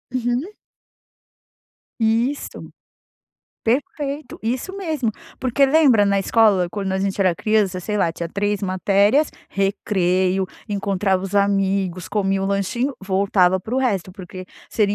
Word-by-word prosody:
Uhum. 245 - -1 1.5
Isso. 230 +5 -1 0.9
Perfeito, 280 +3 -2
isso 250 +10 -2
mesmo. 310 - -1 0.3
Porque 260 +2 +3
lembra 270 -8 +5
na 200 0 +2
escola, 195 -4 +3
quando 195 +1 -3
a 190 - 0
gente 195 0 -1
era 185 -3 +3
criança, 200 -2 +1
sei 210 +3 -3
lá, 170 -4 +1
tinha 170 0 -5
3 205 +2 -1
matérias, 200 +9 +2 0.2
recreio, 190 -1 0 0.2
encontrava 195 -2 0
os 195 - -6
amigos, 195 -2 +1
comia 195 -2 0
um 195 - -1
lanchinho, 235 +7 -1
voltava 190 -1 +2
para 220 +7 -5
o - - +2
resto 200 -8 -1
porque 185 -1 -9 0.2
seria 205 -2 +1
200 Hz, 130 wpm, -21 LUFS, 190-235 Hz, 1.5 s, lembra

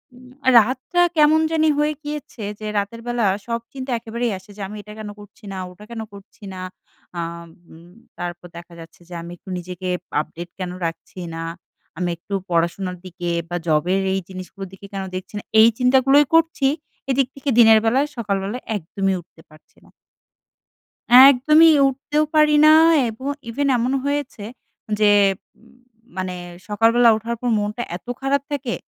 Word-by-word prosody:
উম 250 0 -16 0.3
রাতটা 255 - +2 0.2
কেমন 305 +1 +5
জানি 315 -1 +3
হয়ে 300 +1 +1
গিয়েছে, 295 -6 -7 0.2
যে 215 - -7
রাতের 205 +3 -3
বেলা 240 -2 0 0.2
সব 230 0 -1
চিন্তা 265 -1 -6
একেবারেই 235 +1 -3
আসে 185 +2 -16
যে, - - -8
আমি 210 - -9
এটা 210 +1 -11
কেন 215 -1 -6
করছি 205 0 -16
না? - - -6
ওটা 180 +3 -15
কেন 230 -1 -5
করছি 200 +2 -15
না? 185 - -7 0.6
আ - - 0 0.5
উম 170 +2 -16 0.3
তারপর 175 0 -6
দেখা 170 0 -12
যাচ্ছে 165 +1 -14
যে - - -10
আমি 170 +1 -9
একটু 190 - -15
নিজেকে 180 +1 -7 0.3
আপডেট 170 +3 -9
কেন 180 -1 -4
রাখছি 165 +2 -6 0.2
না? 165 - -5 0.5
আমি 180 0 -1
একটু 185 +4 -10 0.2
পড়াশোনার 175 +2 -1
দিকে 175 -1 -5 0.2
বা, 175 - -3
জবের 170 +5 +2
এই 195 - 0
জিনিসগুলোর 190 +1 -8
দিকে 190 +1 -12
কেন 195 -1 -3
দেখছি 185 +2 -7
না? - - -12 0.2
এই 220 - +9
চিন্তাগুলোই 265 +3 +4
করছি, 325 -4 +3 0.4
এদিক 265 -1 +2
থেকে 275 +1 -4
দিনের 220 -1 +8
বেলায়, 265 +6 +2
সকালবেলায় 205 +1 -3
একদমই 195 +1 -2
উঠতে 160 -1 -22
পারছি 155 0 -21
না। - - -21 1.3
একদমই 280 +5 +8 0.2
উঠতেও 280 +3 0
পারি 305 -1 +5
না 310 - +8 0.4
এবং 225 +5 -9 0.2
even 280 +5 -1
এমন 245 +2 0
হয়েছে, 285 -6 -3 0.6
যে 210 -1 +5 0.5
উম 235 +1 -22 0.4
মানে 185 -1 -3 0.3
সকালবেলা 230 +3 +4
উঠার 230 +2 -4
পর 245 - -2
মনটা 210 +3 -3
এত 180 - -14
খারাপ 270 +1 0
থাকে, 270 -5 -3
220 Hz, 160 wpm, -21 LUFS, 185-265 Hz, 1.3 s, এই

